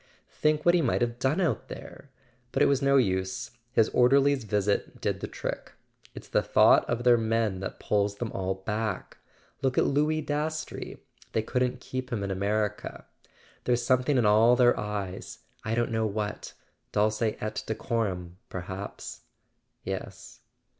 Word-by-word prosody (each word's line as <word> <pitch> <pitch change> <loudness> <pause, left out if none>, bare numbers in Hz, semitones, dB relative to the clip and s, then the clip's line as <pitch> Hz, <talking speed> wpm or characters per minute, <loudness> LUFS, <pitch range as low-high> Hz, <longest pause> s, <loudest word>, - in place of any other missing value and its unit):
Think 150 0 +1
what 175 - +6
he 175 - +4
might - - +1
have 120 0 -1
done 130 +7 +1
out 155 - 0
there! 140 - -10 0.4
But - - +3
it - - +6
was 140 -1 +2
no 140 0 +4
use. 95 -2 0 0.2
His 115 -4 +3
orderly's 135 0 +4
visit 105 0 0
did - - -1
the - - -4
trick. - - -5 0.4
It's - - -9
the - - +2
thought - - +5
of 120 0 -1
their 120 -1 +6
men 110 -3 0
that 95 - -6
pulls 100 -1 +1
them 110 +1 -4
all 95 0 -2
back. 105 +1 -3 0.4
Look 130 -1 0
at - - +4
Louis 150 +2 +1
Dastrey—they 150 -6 -4
couldn't 125 +2 -1
keep 130 +1 -5
him 110 -4 -1
in 100 - -2
America. 105 +2 -2 0.6
There's 120 -1 +2
something 130 +2 +3
in 120 - +3
all 110 +4 +6
their 120 -1 +5
eyes: 100 -3 -4 0.3
I 110 +1 -1
don't 120 +1 0
know 110 -1 +1
what. 105 0 -4 0.4
Dulce 105 +2 +1
et 110 -1 -2
decorum, 95 -6 -2
perhaps 95 +2 -6 0.3
" - - -49
"Yes." - - -6
115 Hz, 160 wpm, -28 LUFS, 105-130 Hz, 0.6 s, what